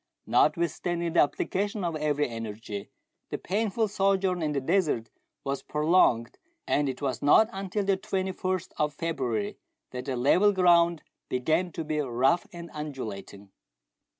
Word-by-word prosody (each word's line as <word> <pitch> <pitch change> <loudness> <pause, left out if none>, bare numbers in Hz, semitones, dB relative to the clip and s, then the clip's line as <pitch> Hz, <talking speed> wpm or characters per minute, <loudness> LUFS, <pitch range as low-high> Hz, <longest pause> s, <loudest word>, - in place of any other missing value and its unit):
Notwithstanding 170 -1 +1
the - - +3
application 200 +7 -1
of 170 -2 -1
every 150 -1 0
energy, 110 -3 -6 0.4
the - - -3
painful 215 +3 0
sojourn 195 -2 +1
in 155 -1 0
the 145 - 0
desert 150 - 0 0.3
was 140 0 -2
prolonged, 150 -7 +2 0.3
and 145 -1 +1
it 130 +2 -6
was 130 -3 -1
not 220 +10 +5
until 195 +1 -2
the 195 -1 +2
21st 185 -1 -2
of 150 -1 0
February 130 -11 -2 0.3
that 125 0 -6
the 135 -2 -2
level 180 +12 +4
ground 170 -3 +4 0.3
began 160 +8 0
to 165 - -4
be 155 0 -2
rough 135 +5 +1
and 170 -1 -9
undulating. 105 -9 -7
160 Hz, 140 wpm, -28 LUFS, 130-185 Hz, 0.4 s, not